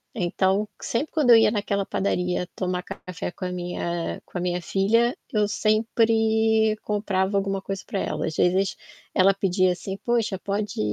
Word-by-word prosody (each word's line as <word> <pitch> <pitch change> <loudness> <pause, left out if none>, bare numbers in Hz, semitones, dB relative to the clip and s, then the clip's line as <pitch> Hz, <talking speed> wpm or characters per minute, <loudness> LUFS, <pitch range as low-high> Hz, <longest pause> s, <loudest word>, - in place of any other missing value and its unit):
Então, 190 +2 +1
sempre 280 +7 -2
quando 290 -7 +3
eu - - +10
ia 225 - +5
naquela 200 -2 -1
padaria 180 -2 -1
tomar 180 -1 -2
café 180 -1 -6
com 185 - -7
a 180 - -3
minha 175 -1 -3
com - - -7
a - - -2
minha 180 0 -1
filha, 230 +7 +2 0.2
eu 210 -1 +2
sempre 220 0 +2
comprava 200 -2 0
alguma 195 -1 -1
coisa 195 -1 -4
pra 195 - -3
ela, - - -2
às 160 - -4
vezes 185 +2 +2 0.4
ela 195 +1 +5
pedia 185 -1 +2
assim: 190 +2 -6
"Poxa, 230 -5 +1
pode 205 +1 -3
195 Hz, 165 wpm, -24 LUFS, 180-220 Hz, 0.4 s, eu